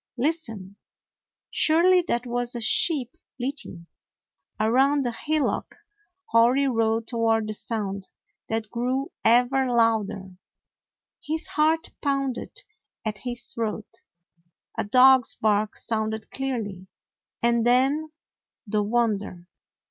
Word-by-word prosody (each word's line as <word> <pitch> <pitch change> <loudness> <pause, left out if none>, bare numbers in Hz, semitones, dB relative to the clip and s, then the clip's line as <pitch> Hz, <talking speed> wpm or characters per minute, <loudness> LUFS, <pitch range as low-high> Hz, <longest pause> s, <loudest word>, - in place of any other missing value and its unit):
Listen! 225 - -2 0.7
Surely 355 +3 +4
that 240 +1 -1
was 245 0 -2
a - - -3
sheep 255 +2 +1 0.2
bleating! 250 - -5 0.7
Around 265 +6 +3
a 240 - 0
hillock 305 +5 -2 0.6
Hori 240 +5 +4
rode 225 -2 +1
toward 225 -2 +1
the 215 - -3
sound 200 -3 -3 0.4
that 225 -1 -3
grew 255 +4 -2
ever 250 +3 +4
louder. 220 -5 +1 0.9
His 315 +1 -2
heart 320 +2 +1
pounded 275 -3 -2 0.4
at 215 -2 -3
his 240 +1 -2
throat. 225 0 -4 0.7
A - - -1
dog's 255 +3 +5
bark 210 0 +1
sounded 220 -1 -2
clearly, 220 -9 -4 0.6
and 235 -1 +3
then, 270 +6 +2 0.5
the 210 0 0
wonder! 205 -5 -1
235 Hz, 100 wpm, -25 LUFS, 220-270 Hz, 0.9 s, dog's